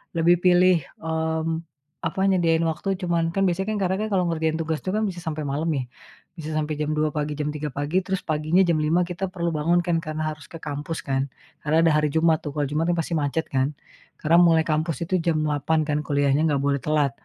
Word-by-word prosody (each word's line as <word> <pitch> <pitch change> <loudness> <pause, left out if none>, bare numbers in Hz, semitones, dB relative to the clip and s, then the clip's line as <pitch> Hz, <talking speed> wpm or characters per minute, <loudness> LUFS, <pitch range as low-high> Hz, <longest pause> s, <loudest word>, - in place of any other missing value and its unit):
lebih 170 +1 +5
pilih, 180 0 +5 0.3
mmm, 160 0 -1 0.6
apa, 165 - -5
nyediain 165 -3 +2
waktu 165 +4 -2
cuman 170 -2 +1
kan 195 - +2
biasanya 190 +2 0
kan - - -1
karena 185 0 +1 0.2
kalau 185 -2 +3
ngerjain 160 -1 0
tugas 160 -1 -2
itu - - -4
kan 215 - +1
bisa 190 -4 -3
sampai 155 -1 -2
malam 150 +4 -1
nih, 135 - -1 0.5
bisa 155 -1 -6
sampai 155 0 -1
jam 150 0 -1
02.00 155 0 +1
pagi, 150 0 -2
jam 150 0 -2
03.00 150 0 -4
pagi, 145 +6 0
terus 190 0 -3
paginya 155 +4 +2
jam 170 -3 +2
5.00 160 +4 +2
kita 180 +2 -3
perlu 170 -2 -2
bangun 165 +3 +2
kan 170 -1 +1
karena 155 -1 -4
harus 155 -1 -11
ke 165 - -9
kampus 150 +2 -4
kan. 135 0 -1 0.3
Karena 160 +2 +2
ada 165 - +5
hari 150 0 +3
Jumat 160 -1 +3
tuh, 145 -1 -7
kalau 150 - 0
Jumat 160 +3 0
pasti 165 0 -3
macet 145 +2 -1
kan. 135 +2 0 0.4
Karena 165 +2 +3
mulai 165 -2 +5
kampus 160 0 -1
itu 185 +2 0
jam 160 -2 0
08.00 150 +1 +1
kan 150 -1 -1
kuliahnya 140 0 +2
nggak 145 -3 +1
boleh 140 0 +1
telat, 150 0 +1
160 Hz, 215 wpm, -24 LUFS, 150-170 Hz, 0.6 s, lebih